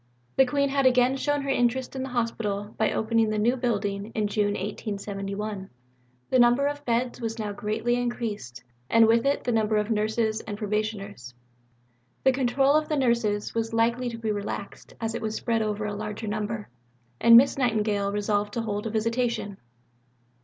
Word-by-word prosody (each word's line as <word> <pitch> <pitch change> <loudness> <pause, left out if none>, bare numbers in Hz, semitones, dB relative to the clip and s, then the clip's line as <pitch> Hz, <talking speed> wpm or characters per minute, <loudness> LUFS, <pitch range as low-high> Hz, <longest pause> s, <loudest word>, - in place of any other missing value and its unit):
The 265 - +5
Queen 280 +1 +1
had 275 -1 +3
again 250 +1 +4
shown 290 +1 0
her 275 - -4
interest 255 0 0
in 265 - -3
the 265 - -4
Hospital 220 -4 -2
by 220 - +1
opening 225 0 +1
the 215 - -1
new 235 +4 +2
building 205 -4 -2
in 215 - +1
June 205 0 0
1871. 200 0 -4 0.6
The 255 - +4
number 240 +3 +5
of 290 0 -2
beds 240 +1 -1
was 225 0 -3
now 210 -2 -3
greatly 215 +4 -1
increased, 215 - -4 0.3
and 230 0 +6
with 230 +3 +3
it 280 - +1
the 245 - 0
number 220 -1 +2
of 210 +2 0
nurses 220 +1 0
and 205 -2 -6
probationers. 210 - -4 0.9
The 265 - +5
control 270 +1 +2
of 305 0 +2
the 305 - 0
nurses 235 -5 +1
was 225 0 -2
likely 235 +2 +1
to 230 - -6
be 225 -1 -2
relaxed 205 -1 -6
as 225 -1 -2
it 235 - -4
was 220 -1 -3
spread 230 -2 0
over 210 -1 -2
a 210 - -3
larger 210 +1 -5
number, 215 0 -3 0.5
and 230 0 +8
Miss 270 +3 +5
Nightingale 210 -5 +1
resolved 205 0 -1
to 235 - 0
hold 210 -1 -3
a - - -2
Visitation. 230 -2 -1
225 Hz, 180 wpm, -26 LUFS, 210-245 Hz, 0.9 s, and